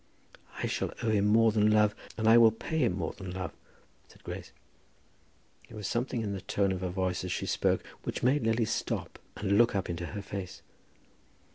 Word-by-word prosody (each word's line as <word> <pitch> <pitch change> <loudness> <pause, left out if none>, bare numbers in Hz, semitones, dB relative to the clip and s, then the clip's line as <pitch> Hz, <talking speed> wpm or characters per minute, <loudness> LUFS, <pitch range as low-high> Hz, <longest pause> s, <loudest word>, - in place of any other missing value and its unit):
"I - - -2
shall - - -1
owe 115 - +2
him 105 -1 +3
more 115 +1 +5
than 105 0 +3
love, 105 -1 +4 0.2
and 110 0 0
I 110 - +8
will 115 -1 +8
pay 135 +9 -3
him 120 - +2
more 80 -4 -2
than 95 -2 -8
love," 90 -1 -4 0.6
said - - -20
Grace. - - -7 1.2
There 110 - -11
was 105 - -6
something 120 +2 -1
in 100 -2 -2
the 95 - -5
tone 100 0 0
of 95 -1 -3
her 90 - -2
voice 90 -1 -1
as 90 - -4
she - - -2
spoke - - +1 0.2
which - - -4
made 135 +4 +3
Lily 115 +1 +2
stop - - -3 0.2
her - - -9
and 100 +2 +4
look 120 -3 +4
up 95 -3 -1
into 85 0 -4
her 100 +7 -6
face. 95 -2 -7
105 Hz, 210 wpm, -30 LUFS, 95-115 Hz, 1.2 s, I